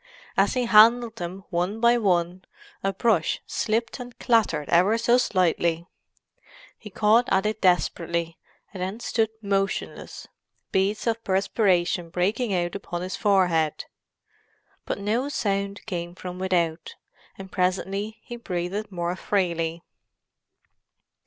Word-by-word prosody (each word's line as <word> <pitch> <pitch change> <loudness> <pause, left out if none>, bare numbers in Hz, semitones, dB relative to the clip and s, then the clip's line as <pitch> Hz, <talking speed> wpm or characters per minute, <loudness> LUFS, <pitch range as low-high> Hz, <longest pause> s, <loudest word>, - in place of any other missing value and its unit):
As - - +2
he 250 -1 +1
handled 230 +1 +5
them 185 +1 -6
one 180 +5 -1
by 235 +1 +5
one, 180 -3 0 0.4
a 195 - +1
brush 195 -6 +1
slipped 230 +3 -2
and 245 -1 -9
clattered 220 - +1
ever 185 +6 +4
so 235 +2 +3
slightly. 170 -5 +1 0.9
He 210 - -11
caught 220 +4 +3
at 190 +1 +2
it 215 +1 -2
desperately, 170 -2 0 0.3
and 190 - -7
then 190 +5 -3
stood 225 -2 0
motionless, 195 -1 -2 0.4
beads 195 +2 0
of 230 -1 -1
perspiration 190 -3 +1
breaking 205 +7 0
out 175 -2 0
upon 175 -3 -5
his 185 - -4
forehead. 175 -6 +1 1.0
But - - -2
no 220 +7 -1
sound 200 -6 -2
came 175 -4 -5
from 180 -1 -7
without, 175 -3 -1 0.4
and 190 -1 -10
presently 195 +3 -1
he 240 - -8
breathed 200 0 -4
more 175 -1 -2
freely. 170 -4 -1
195 Hz, 125 wpm, -25 LUFS, 175-220 Hz, 1.0 s, handled